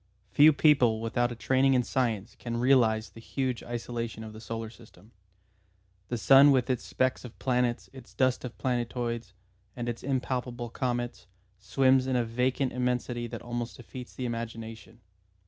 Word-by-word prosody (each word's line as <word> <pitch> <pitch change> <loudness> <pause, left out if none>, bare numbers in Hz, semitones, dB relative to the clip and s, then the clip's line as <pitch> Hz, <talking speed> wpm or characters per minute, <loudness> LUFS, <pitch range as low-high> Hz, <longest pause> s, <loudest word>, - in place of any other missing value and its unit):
Few 150 +2 +7
people 135 -7 +4
without 120 +2 0
a - - -5
training 130 +3 +2
in 125 - +3
science 115 -5 -1
can 115 -1 -4
realise 120 -3 +3
the - - -14
huge 130 0 -2
isolation 115 -2 -5
of 110 -1 -9
the 110 - -10
solar 115 -1 -5
system. 115 -2 -18 1.0
The 120 - -2
sun 135 +5 +7
with 130 -2 +3
its 125 - -2
specks 130 0 -1
of 120 -2 -11
planets, 125 -2 0
its 130 -3 -13
dust 130 -1 +1
of 125 -2 -7
planetoids, 120 -4 -2 0.4
and 120 -1 -4
its 120 -1 -3
impalpable 125 -3 -3
comets, 120 -3 -3 0.3
swims 130 +6 +3
in 130 - 0
a 120 -1 +2
vacant 125 +3 0
immensity 125 -1 -1
that 115 0 -7
almost 120 +1 -4
defeats 125 0 -10
the 130 - -4
imagination. 115 -1 -6
120 Hz, 160 wpm, -28 LUFS, 115-130 Hz, 1.0 s, Few